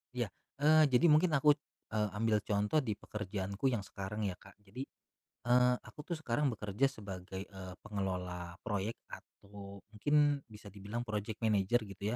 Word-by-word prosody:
Iya. 120 -7 -1 0.3
Eee, 155 +1 +7
jadi 130 +4 +4
mungkin 160 +3 +5
aku, 150 +2 +6 0.4
eee, 105 -1 +1
ambil 110 0 +2
contoh 105 +8 +2
di 115 -8 -1
pekerjaanku 100 +1 -3
yang 120 -6 +1
sekarang 100 +2 -5
ya 95 -3 -1
Kak. 95 - -16
Jadi, 105 +7 -6 0.6
eee, 125 0 +5
aku - - -14
tuh - - 0
sekarang 145 -1 +1
bekerja 110 +3 0
sebagai, 95 -5 -7
eee, 95 -2 -9
pengelola 90 -4 -3
proyek 105 0 -1
atau 100 -1 -11
mungkin 145 +4 +3
bisa 105 -1 -12
dibilang 105 +4 -4
project 105 0 -3
manager 110 +2 +3
gitu 100 +3 -3
105 Hz, 155 wpm, -34 LUFS, 100-125 Hz, 0.6 s, Eee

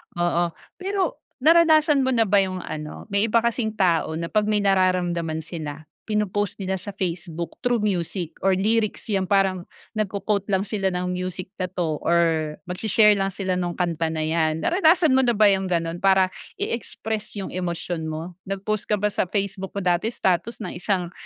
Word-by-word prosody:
oo. 175 -1 +1 0.3
Pero 385 0 -1 0.2
naranasan 315 -3 +5
mo 260 - +1
na 225 - +4
ba 200 -1 +3
'yung 185 -1 -1
ano 155 0 -6
may 200 +2 +3
iba 230 +1 +3
kasing 230 -2 0
tao 170 -5 +2
na 170 +1 -4
pag 210 -1 +2
may 210 -1 +2
nararamdaman 175 -4 +1
sila 155 -2 -6 0.2
pino-post 205 -1 0
nila 190 0 -1
sa 200 +1 -7
Facebook 170 -3 -4
through 240 -3 +1
music 180 -3 -1
or 190 -1 +2
lyrics 215 +2 0
'yang 190 -2 +1
parang 195 -2 +1 0.2
nagko-quote 205 -1 -1
lang 195 -2 +1
sila 200 -2 -1
ng 180 0 -1
music 185 0 -4
na 185 - 0
'to 170 -4 -2
or 160 -3 +1
magsi-share 210 +4 +3
lang 195 -1 +2
sila 185 -1 -2
nung 175 -1 -2
kanta 170 -2 0
na 160 -1 -2
yan, 160 0 0
naranasan 335 -3 +4
mo 260 - +5
na 245 -3 +3
ba 210 -1 +6
yung 190 -1 0
ganon 170 -1 -1
para 190 -1 +4 0.2
i-express 220 -2 -4
'yung 200 -2 -5
emosyon 175 -2 -3
mo? 160 +3 -5 0.2
Nag 195 0 -4
post 215 0 -2
ka 210 - +2
ba 210 +1 0
sa 190 - 0
Facebook 195 0 -3
mo 200 - -2
dati 180 +3 +2
status 220 +1 -1
ng 180 -2 -6
isang 180 -3 -1
190 Hz, 180 wpm, -24 LUFS, 175-210 Hz, 0.3 s, ba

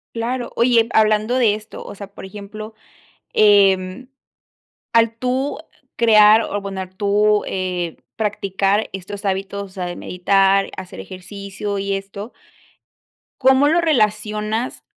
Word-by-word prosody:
Claro. 240 +2 -3
Oye, 235 -1 +3
hablando 215 +3 +3
de 220 -5 +3
esto, 215 0 -10
o - - -9
sea, 200 0 -8
por - - -11
ejemplo, 210 +2 -9 0.6
em, 200 +2 +3 0.8
al 230 0 +3
tú 255 +3 -1 0.4
crear 215 -1 +6
o - - -5
abonar 195 -2 -5
tú, 210 +1 +2
eh, 180 -3 -3 0.2
practicar 200 -1 0
estos 195 +2 -7
hábitos, 195 +1 -2
o 200 - -10
sea, 185 -1 -5
de 175 - -5
meditar, 195 +2 +2
hacer 185 -1 -9
ejercicio 200 +2 -6
y 200 0 -2
esto 200 +3 -6 1.1
¿cómo 265 +2 +5
lo 335 +3 +3
relacionas 215 -4 0
205 Hz, 125 wpm, -20 LUFS, 195-225 Hz, 1.1 s, crear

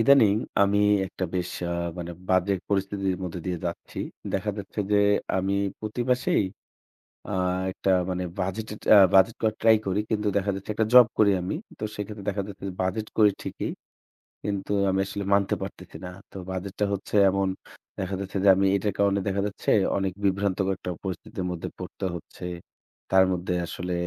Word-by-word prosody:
ইদানিং 115 -4 +6 0.3
আমি 100 +1 +3 0.3
একটা 95 0 -4
বেশ 90 -1 -1 0.2
আ - - 0 0.3
মানে 85 0 -5 0.2
বাজে 95 +1 +3 0.2
পরিস্থিতির 95 -1 0
মধ্যে 90 0 -5
দিয়ে 90 -2 -1
যাচ্ছি। 85 - -6 0.3
দেখা 100 +2 0
যাচ্ছে 100 +1 -5
যে - - +5 0.4
আমি 95 +1 0 0.3
প্রতি 110 +3 -4
মাসেই 125 -4 +2 0.8
আ - - -3 0.4
একটা 95 - -1 0.2
মানে 90 0 -2 0.2
বাজেটের 105 +3 -3 0.4
বাজেট 95 +4 +6
করার 110 -1 +1
ট্রাই 110 0 +7
করি। 95 +2 +1
কিন্তু 105 -1 +1
দেখা 100 0 +1
যাচ্ছে 95 +2 -6
একটা 110 +1 +1
জব 125 -2 +10
করি 105 -2 +6
আমি। 90 - -2 0.2
তো - - -4
সেক্ষেত্রে 105 0 -6
দেখা 100 0 -2
যাচ্ছে 100 -1 -10
যে - - -4
বাজেট 105 +4 -1
করি 105 -2 +7
ঠিকই। - - -4 0.7
কিন্তু 100 -1 -2 0.2
আমি 95 - +1
আসলে 100 0 -4
মানতে 100 -1 +2
পারতেছি - - -8
না। - - -4 0.2
তো - - -12
বাজেট 95 +1 -4
টা - - +4
হচ্ছে 100 - -7 0.2
এমন 95 0 +1 0.5
দেখা 95 0 -2
যাচ্ছে 100 0 -5
যে - - +6
আমি 100 - +3
এটার 100 +1 -1
কারণে 100 -1 +3
দেখা 100 0 0
যাচ্ছে 100 - -3 0.3
অনেক 95 -1 -1
বিভ্রান্তকর 95 0 +1
একটা 90 - -5
পরিস্থিতির 95 0 -5
মধ্যে 85 -2 -4
পড়তে - - -6
হচ্ছে। 85 - -11 0.7
তার 95 0 +6
মধ্যে 90 0 -2
আসলে 90 +2 -5
100 Hz, 170 wpm, -26 LUFS, 95-105 Hz, 0.8 s, জব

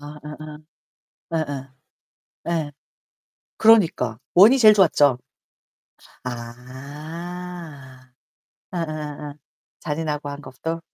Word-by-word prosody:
아아아. 150 +1 -9 1.0
예예. 145 -4 -2 0.8
예. 160 -3 -1 0.9
그러니까 170 - +4 0.2
1 205 +8 +9
이 270 - +2
제일 215 -3 +9
좋았죠. 150 -9 +4 1.1
아. 140 +4 -8 0.6
예예예예. 150 -3 -4 0.5
잔인하고 150 -2 -3
한 145 0 -7
것도? 155 +5 -5
150 Hz, 155 characters per minute, -23 LUFS, 135-170 Hz, 1.1 s, 1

